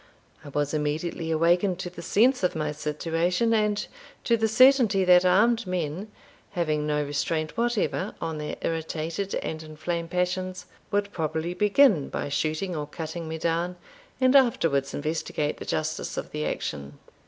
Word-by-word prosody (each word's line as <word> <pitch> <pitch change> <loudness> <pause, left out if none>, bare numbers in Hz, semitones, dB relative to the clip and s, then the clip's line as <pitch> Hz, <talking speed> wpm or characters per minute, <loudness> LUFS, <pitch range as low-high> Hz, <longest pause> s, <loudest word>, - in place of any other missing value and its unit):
I 145 - -9
was 145 +1 -1
immediately 155 +2 -2
awakened 175 +3 +2
to 180 -1 -5
the 175 - -9
sense 245 +9 +3
of 180 - +1
my 155 -1 -1
situation, 165 +8 0
and 210 -1 +1 0.4
to 235 - +3
the 220 -1 +1
certainty 225 -4 +5
that 180 0 +6
armed 225 +4 +3
men, 180 +3 -3 0.4
having 155 -4 0
no 150 0 +1
restraint 155 +2 -2
whatever 230 -4 -1
on 160 -2 -3
their 150 - -4
irritated 165 +4 -2
and 160 0 -4
inflamed 160 +2 -4
passions, 180 0 -2 0.2
would 205 0 0
probably 160 0 -2
begin 210 - +4
by - - -3
shooting 155 +5 -1
or 150 -1 -3
cutting 160 +2 -6
me 160 0 -4
down, 170 +2 -1 0.4
and 255 +1 +4
afterwards 165 - +3
investigate 150 0 -2
the - - -8
justice 155 0 -2
of - - -5
the 150 0 -2
action. 70 -1 -4
170 Hz, 155 wpm, -26 LUFS, 155-195 Hz, 0.4 s, that